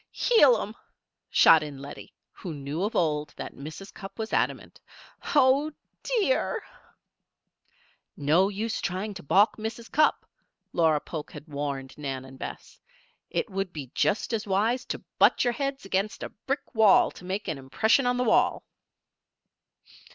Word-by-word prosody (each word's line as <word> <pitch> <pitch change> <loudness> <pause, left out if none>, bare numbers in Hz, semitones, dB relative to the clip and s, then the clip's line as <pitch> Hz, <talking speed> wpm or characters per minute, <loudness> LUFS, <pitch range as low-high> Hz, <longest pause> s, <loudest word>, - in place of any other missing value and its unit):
"Heel 290 - +5
'em!" 210 - -5 0.6
shot 160 - +7
in 150 -2 -6
Lettie, 140 +1 -10 0.2
who 170 -4 -7
knew 145 +4 -4
of 210 - -2
old 150 -3 0
that - - -6
Mrs. 155 +8 -9
Cupp 195 -1 -10
was 220 -1 -4
adamant. - - -1 0.5
"Oh, 285 +2 +4 0.3
dear!" 470 -1 0 1.5
"No 165 +7 +3
use 215 +3 -3
trying 195 +3 -3
to 190 - -8
balk 195 +8 +3
Mrs. 220 +1 -6
Cupp," 305 +1 +3 0.5
Laura 160 -3 +3
Polk 155 0 -7
had 155 - -10
warned 140 -2 -4
Nan 135 -3 -4
and 130 0 -13
Bess. - - -8 0.5
"It - - -2
would 195 -1 -2
be 140 -6 -8
just 210 +3 0
as 215 -2 -2
wise 220 +6 +1
to - - -5 0.2
butt - - +5
your 245 -1 +1
heads 275 0 -3
against 195 +2 -1
a - - -4 0.2
brick 275 +1 -3
wall 220 -3 +5
to - - -14
make 190 +3 -4
an 160 -5 -3
impression 220 - +2
on 245 0 +1
the 250 - +1
wall!" 245 - +2
195 Hz, 150 wpm, -27 LUFS, 150-230 Hz, 1.5 s, shot